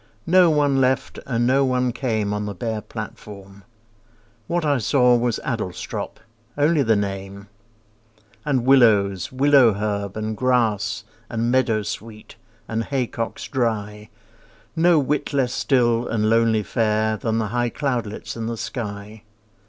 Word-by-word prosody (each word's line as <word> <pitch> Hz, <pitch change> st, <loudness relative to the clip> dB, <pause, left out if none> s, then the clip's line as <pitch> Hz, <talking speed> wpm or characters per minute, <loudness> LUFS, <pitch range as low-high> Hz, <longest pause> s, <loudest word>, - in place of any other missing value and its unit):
No 180 Hz, 0 st, +5 dB
one 145 Hz, -3 st, +2 dB
left 130 Hz, 0 st, 0 dB
and 120 Hz, -2 st, 0 dB
no 135 Hz, +3 st, +3 dB
one 125 Hz, -1 st, +1 dB
came 110 Hz, -5 st, -1 dB
On 105 Hz, 0 st, -3 dB
the 100 Hz, -, -5 dB
bare 110 Hz, +3 st, -3 dB
platform. 100 Hz, -1 st, -9 dB, 0.8 s
What 175 Hz, -1 st, -1 dB
I 145 Hz, -3 st, +2 dB
saw 125 Hz, +1 st, +3 dB
Was 120 Hz, -1 st, 0 dB
Adlestrop—only 115 Hz, -, -3 dB
the 115 Hz, -4 st, +3 dB
name 100 Hz, 0 st, -4 dB, 0.9 s
And 135 Hz, -5 st, 0 dB
willows, 110 Hz, -4 st, +4 dB
willow 135 Hz, -3 st, +5 dB
herb, 100 Hz, -1 st, -3 dB
and 110 Hz, 0 st, -3 dB
grass, 110 Hz, -4 st, 0 dB, 0.3 s
And 115 Hz, +1 st, -1 dB
meadowsweet, 110 Hz, -3 st, -2 dB, 0.3 s
and 115 Hz, 0 st, -2 dB
haycocks 125 Hz, -4 st, -3 dB
dry, 105 Hz, -4 st, -2 dB, 0.7 s
No 170 Hz, +1 st, +4 dB
whit 145 Hz, 0 st, -1 dB
less 130 Hz, -3 st, +1 dB
still 120 Hz, -4 st, +1 dB
and 110 Hz, -1 st, 0 dB
lonely 115 Hz, -1 st, +3 dB
fair 110 Hz, -1 st, 0 dB
Than 110 Hz, +1 st, -2 dB
the 110 Hz, -2 st, -1 dB
high 120 Hz, +1 st, 0 dB
cloudlets 120 Hz, -6 st, -3 dB
in 115 Hz, -1 st, -4 dB
the 115 Hz, 0 st, -4 dB
sky. 105 Hz, -2 st, -6 dB
115 Hz, 130 wpm, -22 LUFS, 105-130 Hz, 0.9 s, No